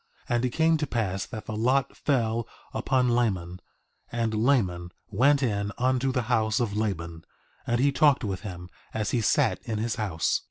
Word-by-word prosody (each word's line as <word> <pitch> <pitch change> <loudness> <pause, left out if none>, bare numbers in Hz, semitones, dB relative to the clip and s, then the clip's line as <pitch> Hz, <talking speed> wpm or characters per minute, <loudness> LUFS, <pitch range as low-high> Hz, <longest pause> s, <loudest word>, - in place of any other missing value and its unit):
And 120 0 +1
it 125 - +2
came 160 +5 +3
to 150 -1 -2
pass 100 -6 -2
that 110 -3 -7
the 110 - -5
lot 130 +5 +1
fell 115 -4 0 0.3
upon 130 -2 +1
Laman; 95 -7 0 0.5
and 115 -2 -1
Laman 105 -7 +1 0.2
went 140 +7 +4
in 100 -4 0
unto 130 +1 +1
the 125 -1 0
house 110 -1 +1
of 110 -4 -1
Laban, 85 -6 -3 0.4
and 120 0 +1
he 140 +2 +4
talked 140 -1 +4
with 95 -3 -2
him 90 -4 -8 0.2
as 105 -2 -1
he 120 - +1
sat - - +2
in 110 - -4
his 110 +2 -2
house. 95 -7 0
115 Hz, 175 wpm, -27 LUFS, 100-125 Hz, 0.5 s, went